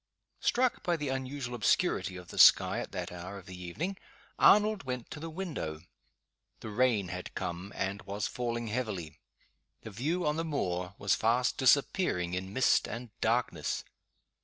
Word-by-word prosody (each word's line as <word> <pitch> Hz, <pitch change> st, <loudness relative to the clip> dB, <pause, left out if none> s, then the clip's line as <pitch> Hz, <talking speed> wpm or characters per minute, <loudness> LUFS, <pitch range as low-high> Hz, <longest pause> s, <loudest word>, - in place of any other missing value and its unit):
Struck 250 Hz, 0 st, +1 dB
by 175 Hz, -1 st, 0 dB
the 150 Hz, -3 st, -3 dB
unusual 130 Hz, -1 st, -3 dB
obscurity 105 Hz, -4 st, +1 dB
of 90 Hz, -1 st, -11 dB
the -, -, -6 dB
sky -, -, +7 dB
at -, -, -5 dB
that -, -, -4 dB
hour 90 Hz, +3 st, -7 dB
of 95 Hz, -, -11 dB
the 90 Hz, 0 st, -9 dB
evening, 165 Hz, -, -4 dB, 0.4 s
Arnold 210 Hz, 0 st, +6 dB
went 125 Hz, -2 st, -5 dB
to 150 Hz, -, -6 dB
the 165 Hz, +2 st, -5 dB
window. 155 Hz, -, -4 dB, 0.8 s
The 110 Hz, -, -6 dB
rain 110 Hz, -5 st, +2 dB
had 90 Hz, 0 st, -6 dB
come 90 Hz, +3 st, -4 dB
and 100 Hz, +2 st, -2 dB
was 100 Hz, 0 st, -3 dB
falling 120 Hz, -1 st, -2 dB
heavily. 105 Hz, -, -3 dB, 0.6 s
The 110 Hz, -, -8 dB
view 155 Hz, -, -1 dB
on 150 Hz, +1 st, +1 dB
the 165 Hz, -, 0 dB
moor 90 Hz, -, -2 dB
was 100 Hz, -, +2 dB
fast 120 Hz, +3 st, +2 dB
disappearing 130 Hz, -, +3 dB
in 95 Hz, +1 st, -3 dB
mist 130 Hz, +5 st, +3 dB
and 120 Hz, -1 st, -6 dB
darkness. 115 Hz, -9 st, 0 dB
120 Hz, 160 wpm, -31 LUFS, 95-145 Hz, 0.8 s, sky